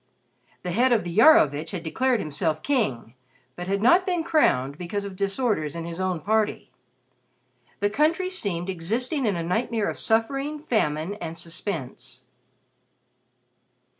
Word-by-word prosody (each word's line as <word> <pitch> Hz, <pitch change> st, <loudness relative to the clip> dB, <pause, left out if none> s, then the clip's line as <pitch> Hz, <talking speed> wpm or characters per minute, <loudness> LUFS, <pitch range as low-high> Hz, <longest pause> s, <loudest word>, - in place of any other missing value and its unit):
The 180 Hz, -, -3 dB
head 245 Hz, +7 st, +3 dB
of 230 Hz, -5 st, +3 dB
the 175 Hz, -1 st, -6 dB
Iarovitch 165 Hz, -, +5 dB
had 175 Hz, -3 st, -4 dB
declared 250 Hz, +9 st, +1 dB
himself 155 Hz, -1 st, -2 dB
king 205 Hz, -, -1 dB, 0.4 s
but 175 Hz, -, -6 dB
had 200 Hz, +2 st, -1 dB
not 345 Hz, +10 st, +6 dB
been 355 Hz, -3 st, -1 dB
crowned 140 Hz, -, +2 dB
because 200 Hz, +3 st, -3 dB
of 195 Hz, -2 st, -7 dB
disorders 195 Hz, -, -1 dB
in 165 Hz, 0 st, -5 dB
his 170 Hz, +2 st, -5 dB
own 185 Hz, -3 st, -1 dB
party. 215 Hz, +2 st, 0 dB, 1.1 s
The 205 Hz, -, +2 dB
country 330 Hz, -, +1 dB
seemed 190 Hz, -, -2 dB
existing 230 Hz, -, -1 dB
in 200 Hz, -, +1 dB
a 170 Hz, -, -2 dB
nightmare 215 Hz, +4 st, -1 dB
of -, -, -8 dB
suffering, 275 Hz, +7 st, 0 dB
famine 160 Hz, -, 0 dB
and 165 Hz, -1 st, -5 dB
suspense. 165 Hz, -5 st, -6 dB
200 Hz, 140 wpm, -25 LUFS, 165-250 Hz, 1.1 s, not